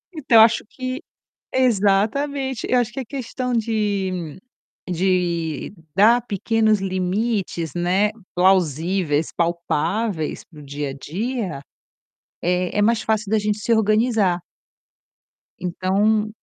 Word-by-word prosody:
Então, 270 -6 +3
eu - - +10
acho 225 +1 +5
que 255 0 -5 0.6
Exatamente, 255 +4 +1
eu 250 - +4
acho 240 -1 -3
que 245 - -6
a 260 - -4
questão 250 0 -4
de 200 -7 -1 0.6
de 175 -4 0 0.2
dar 225 +5 +6
pequenos 215 +1 +1
limites, 190 - -2
né, 180 +4 +2 0.3
plausíveis, 175 -3 +2
palpáveis 170 +2 -1
para 155 - -14
o - - -11
dia 145 0 -4
a - - -5
dia 185 - -4 0.8
é 180 +2 0
é - - +4
mais 230 +2 +2
fácil 215 -2 -1
da 220 - +3
gente 210 0 -1
se 230 - 0
organizar. 215 -4 +2 1.2
Então, 200 +4 +1
200 Hz, 115 wpm, -22 LUFS, 180-225 Hz, 1.2 s, eu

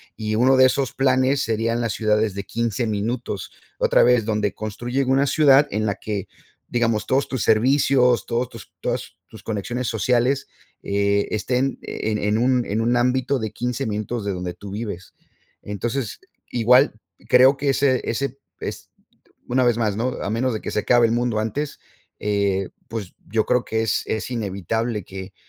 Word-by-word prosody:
Y 110 -1 -2
uno 130 +4 +4
de 130 0 +7
esos 135 0 -1
planes 130 +1 +2
serían 115 +1 0
las 115 -3 -1
ciudades 105 -2 +1
de 100 - -4
15 115 +3 -2
minutos, 110 -1 -3 0.3
otra - - +4
vez, 120 -3 +4
donde 105 -3 0
construyen 120 +6 -3
una 135 +1 +3
ciudad 145 0 +5
en 110 +1 -1
la 100 - 0
que, 105 -3 -4 0.4
digamos, 115 -3 0
todos 135 +2 +1
tus 130 -4 -3
servicios, 125 +1 +3
todos 120 +2 0
tus 115 -3 -12
todas - - -4
tus - - -13
conexiones 120 +4 -3
sociales, 125 +5 +1 0.4
eh, 100 0 +1
estén 125 +5 0
en 110 -1 -3
en - - -5
en 105 +1 +2
un 125 +1 +2
en 105 +3 -1
un 120 +2 +2
ámbito 130 +2 +1
de 110 -1 -3
15 125 +3 -3
minutos 110 +2 -3
de 100 - -2
donde 90 -1 -4
tú 100 +3 -10
vives. 100 -2 -6 0.5
Entonces, 115 +3 -3 0.3
igual 125 +3 +4 0.3
creo 130 +2 +6
que 140 0 0
ese 135 -1 +2
ese 135 +3 -2 0.2
es, - - -6 0.6
una 130 +1 +2
vez 120 -2 +3
más, 105 -3 0
¿no? 120 +3 0
A - - -2
menos 120 +4 0
de 110 - -4
que - - -5
se - - 0
acabe 120 +1 +4
el - - -1
mundo 120 -2 0
antes, 140 +7 -3 0.4
eh, 100 -2 0 0.2
pues, 110 -5 -6
yo 110 +1 +1
creo 125 - +2
que 110 0 -1
es 110 -2 0
es 110 - -3
inevitable 110 0 -2
que, 95 +1 -9
115 Hz, 175 wpm, -22 LUFS, 105-125 Hz, 0.6 s, de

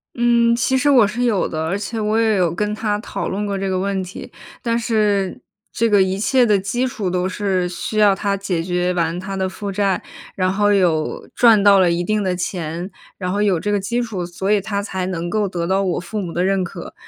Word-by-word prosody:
嗯， 235 -1 +3
其 265 +2 +1
实 285 +3 +3
我 245 -7 +6
是 230 +4 -2
有 225 -6 +1
的， 155 0 -3
而 170 +4 -1
且 220 +2 -4
我 215 +1 +1
也 220 -2 +3
有 175 -3 +1
跟 210 +4 -1
他 210 -1 -1
讨 215 - -4
论 205 +2 -2
过 200 -1 -2
这 195 0 -2
个 185 -1 0
问 195 0 -1
题， 185 +1 -9 0.3
但 230 -1 0
是 210 -5 0 0.3
这 230 0 +1
个 205 -2 +5
一 190 +1 -2
切 250 +4 +3
的 210 -3 +3
基 220 +7 -1
础 210 -6 -3
都 180 0 0
是 190 -1 -1
需 175 +5 -5
要 210 -2 +5
他 200 0 -1
解 190 -4 -2
决 180 +1 -1
完 170 0 -1
他 195 +1 -5
的 190 -1 -1
负 200 +1 -5
债， 195 -1 0 0.3
然 185 -1 +1
后 205 +1 +2
有 170 -6 +1
赚 225 -4 +5
到 200 -1 +6
了 180 -2 +4
一 170 +1 0
定 215 +3 0
的 185 -2 0
钱， 175 0 -4 0.3
然 180 -2 -3
后 200 +2 0
有 195 -5 +2
这 205 +4 -2
个 205 - +1
基 235 +5 -1
础， 210 -6 -4
所 180 +3 -3
以 210 -1 +3
他 200 0 -3
才 190 -3 -3
能 175 -2 -3
够 210 -1 +1
得 175 -3 -3
到 190 +3 +1
我 185 -3 -1
父 185 +4 -5
母 175 -3 -5
的 175 +2 -1
认 195 -1 +1
可。 175 - -8
195 Hz, 255 characters per minute, -20 LUFS, 180-210 Hz, 0.3 s, 我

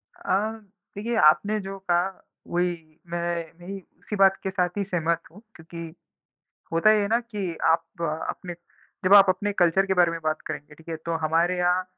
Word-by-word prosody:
अ, 355 -1 -5 0.6
देखिए, 225 +4 -2
आपने 210 +4 +4
जो 195 0 -6
कहा 180 -1 +1 0.4
वही 170 -3 -2
मैं 170 -1 -2
नहीं, 195 +2 -7 0.2
उसी 210 - -5
बात 195 -1 +5
के 190 - -1
साथ 180 -2 0
ही 200 - +1
सहमत 170 -3 0
हूँ 200 +5 -15
क्योंकि 165 0 -9 0.8
होता 165 +6 +5
ये 215 -1 +4
है 200 - 0
ना 230 +3 +2
कि 205 -7 -5
आप 165 0 +3 0.4
अपने 175 -1 -5 0.5
जब 190 - +5
आप 200 -1 +9
अपने 195 +3 0
कल्चर 190 +1 +3
के 195 - +1
बारे 175 -2 +4
में 165 - -4
बात 155 0 -1
करेंगे, 150 +1 -7
ठीक 160 +2 -19
है? 165 - -2
तो 165 +1 -4
हमारे 165 +3 +1
यहाँ 180 +1 +2
180 Hz, 185 wpm, -25 LUFS, 165-195 Hz, 0.8 s, आप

